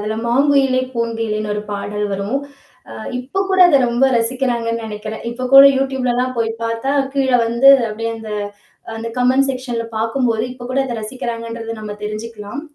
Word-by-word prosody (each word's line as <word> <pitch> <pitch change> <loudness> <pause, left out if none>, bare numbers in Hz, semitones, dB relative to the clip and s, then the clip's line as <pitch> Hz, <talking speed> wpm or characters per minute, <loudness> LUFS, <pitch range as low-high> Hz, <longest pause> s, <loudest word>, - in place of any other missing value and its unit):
அதில 215 +1 -3
"மாங்குயிலே 270 +1 +3
பூங்குயிலேன்னு" 225 -3 -2
ஒரு 210 - -3
பாடல் 210 +1 -3
வரும். 200 +6 -2 0.5
ஆ - - -8 0.3
இப்ப 265 +10 -3
கூட 380 -1 +1
அத 285 -5 +5
ரொம்ப 240 +3 +2
ரசிக்கிறாங்கன்னு 230 -1 -1
நினைக்கிறேன். 215 0 -6
இப்ப 255 +2 -4
கூட 275 0 +11
யூடூப்பில் 265 -1 -1
லலாம் 250 +1 0
போய் 225 -1 0
பார்த்தா 230 +4 -1 0.2
கீழ 270 -1 +1 0.2
வந்து 235 +4 +4 0.2
அப்பிடியே 225 +2 -4
அந்த 220 -1 -9 0.7
அந்த 225 +1 -5
கமெண்ட் 255 +2 +3
செக்ஷன்ல 250 -3 -3
பார்க்கும்போது, 225 0 0
இப்போ 245 -1 -10
கூட 265 - +1
அத 240 - -4
ரசிக்கிறாங்கன்றத 230 0 -5
நம்ம 210 -1 -6
தெரிஞ்சிக்கலாம். 215 +3 -6
230 Hz, 155 wpm, -18 LUFS, 220-255 Hz, 0.7 s, கூட